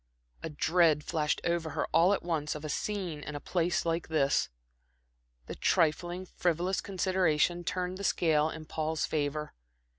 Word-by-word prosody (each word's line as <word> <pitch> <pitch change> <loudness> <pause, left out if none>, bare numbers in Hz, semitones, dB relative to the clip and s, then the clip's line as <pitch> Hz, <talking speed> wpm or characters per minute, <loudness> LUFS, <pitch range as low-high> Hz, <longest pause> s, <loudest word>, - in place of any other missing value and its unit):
A - - -4
dread 155 0 +3
flashed 150 -2 -1
over 170 -1 0
her - - +1
all 175 +4 +5
at 205 - 0
once 155 -4 -1
of 150 0 -7
a - - -4
scene 180 -1 -3
in 150 0 -6
a - - -3
place 175 +2 0
like 165 0 -1
this. 150 -4 +2 1.0
The - - -6
trifling, 175 +3 +1
frivolous 180 +1 -1
consideration 180 -3 +1
turned 180 +1 -3
the - - -5
scale 155 -5 +2
in 160 0 -8
Paul's 155 0 -2
favor. 150 0 -2
165 Hz, 155 wpm, -30 LUFS, 155-180 Hz, 1.0 s, all